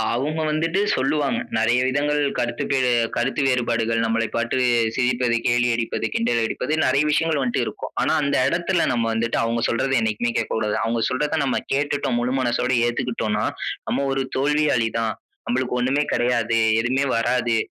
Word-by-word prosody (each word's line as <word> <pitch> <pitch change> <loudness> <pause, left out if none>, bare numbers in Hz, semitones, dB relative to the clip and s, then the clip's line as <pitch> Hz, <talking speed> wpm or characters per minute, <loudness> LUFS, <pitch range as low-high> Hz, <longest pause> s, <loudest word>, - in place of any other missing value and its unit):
அவங்க 150 +5 -2
வந்துட்டு 165 +5 0
சொல்லுவாங்க. 140 +1 0 0.2
நெறைய 120 +3 +2
விதங்கள் 145 +2 0 0.2
கருத்துக்கு 120 +3 -1 0.4
கருத்து 130 +4 0
வேறுபாடுகள் 115 -3 0
நம்மளை 115 0 0
பார்த்து 115 +2 -1 0.4
சிரிப்பது, 125 -1 +1
கேலி 120 +1 +2
அடிப்பது, 115 -1 -2
கிண்டலடிப்பது 120 +4 -1
நெறைய 140 +3 +3
விஷயங்கள் 155 -1 +1
வந்துட்டு 125 -2 0
இருக்கும். - - -6
ஆனா - - +1
அந்த 140 0 0
எடத்தில 175 +2 0
நம்ம 115 -2 0
வந்துட்டு 115 +1 -1
அவங்க 115 0 -1
சொல்றத 135 +3 0
என்னைக்குமே 110 +2 -1
கேட்க 115 - -2
கூடாது. 110 -1 -1
அவங்க 115 0 -1
சொல்றத 150 +4 -1
நம்ம 130 - 0
கேட்டுட்டோம் 140 -3 0
முழு 125 +2 -1
மனசோட 125 0 0
ஏத்துக்கிட்டோனா 115 -3 -1 0.5
"நம்ம 140 - 0
1 135 0 0
தோல்வியாளி 145 -4 +2
தான். 110 -1 -1 0.3
நமளுக்கு 130 - -1
ஒண்ணுமே 135 +4 +1
கெடையாது. 115 -2 +1 0.2
எதுவுமே 130 +4 0
வராது. 120 0 +1
125 Hz, 150 wpm, -22 LUFS, 115-140 Hz, 0.5 s, நெறைய